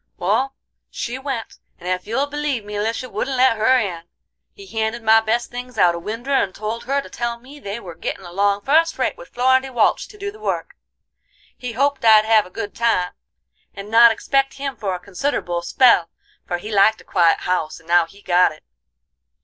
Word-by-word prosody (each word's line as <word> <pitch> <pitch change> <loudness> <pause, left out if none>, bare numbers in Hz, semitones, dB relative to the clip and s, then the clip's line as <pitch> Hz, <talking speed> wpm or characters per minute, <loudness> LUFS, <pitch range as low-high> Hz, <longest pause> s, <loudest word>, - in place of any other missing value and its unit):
"Wal, 270 +1 0 0.3
she 245 +2 -5
went, 265 -5 -5 0.2
and 175 - -10
ef 185 +1 -2
you'll 250 +6 0
believe 285 -6 -3
me 210 - -8
Lisha 225 +4 -2
wouldn't 265 +1 -3
let 255 -2 +4
her 225 +4 +3
in! 180 -8 -3 0.5
He 400 - -13
handed 225 - -3
my 220 0 +6
best 230 +2 -1
things 245 -1 -8
out 175 -4 +4
a 170 - -5
winder 230 +9 -5
and 200 -9 +1
told 220 +2 -5
her 275 +2 0
to - - -12
tell 235 -1 -3
me 275 +4 -14
they 205 -2 -5
were 180 -6 -9
gittin' 185 - -5
along 200 +3 0
fust 325 +7 +2
rate - - 0
with - - -13
Florindy 260 +2 +2
Walch 245 -4 +1
to 420 - -15
do 405 0 -5
the 425 - -15
work. 430 - -3 0.8
He 250 -2 -6
hoped 280 +3 0
I'd 215 -1 +7
have 220 -3 +4
a - - -15
good 205 +2 -6
time, 225 -7 +1 0.6
and 200 +2 -8
not 230 +1 +8
expect 270 +4 0
him 275 -1 -4
for 195 -4 -3
a - - -6
consider'ble 180 -2 -2
spell, 180 -3 +4 0.4
for 175 - -1
he 210 +5 -8
liked 215 +2 +4
a - - -17
quiet 170 -2 +2
house, 180 -4 -2
and 165 - -23
now 170 -1 +4
he'd 200 +4 -19
got 180 0 +4
it. 155 - -15
225 Hz, 205 wpm, -21 LUFS, 195-260 Hz, 0.8 s, not